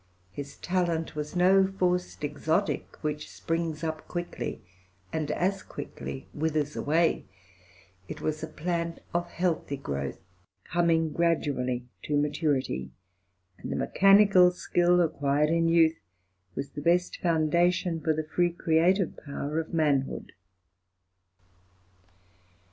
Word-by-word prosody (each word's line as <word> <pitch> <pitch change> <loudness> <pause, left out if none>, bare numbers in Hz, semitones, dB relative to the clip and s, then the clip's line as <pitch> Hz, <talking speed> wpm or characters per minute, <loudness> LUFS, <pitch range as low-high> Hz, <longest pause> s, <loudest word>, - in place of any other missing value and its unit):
His 140 0 -8
talent 170 -4 -1
was 150 +3 -4
no 190 +2 +5
forced 180 -3 0
exotic, 160 +6 -1
which 150 0 -3
springs 165 -1 -3
up 160 -1 -4
quickly 175 0 -5 0.5
and 155 -2 -1
as 185 +5 0
quickly 140 -1 -7
withers 150 -1 -1
away; 160 +3 +1 0.8
it - - -7
was 155 0 -2
a 160 - -3
plant 170 +1 -3 0.2
of 175 0 -1
healthy 170 -6 -1
growth, 70 - -4 0.5
coming 165 -2 +1
gradually 140 -7 0 0.2
to 150 - -1
maturity; 145 - 0 0.7
and - - -6
the - - -1
mechanical 195 -2 +6
skill 175 0 +2
acquired 150 -1 +1
in 165 0 +2
youth 165 -1 +4 0.6
was 140 +1 -4
the 145 - -6
best 175 +3 +1
foundation 170 +1 +2
for 160 - +1
the 155 0 -1
free 175 +2 +2
creative 170 +3 +2
power 145 +2 -3
of 160 - -5
manhood. 145 -5 0
160 Hz, 115 wpm, -28 LUFS, 150-175 Hz, 0.8 s, mechanical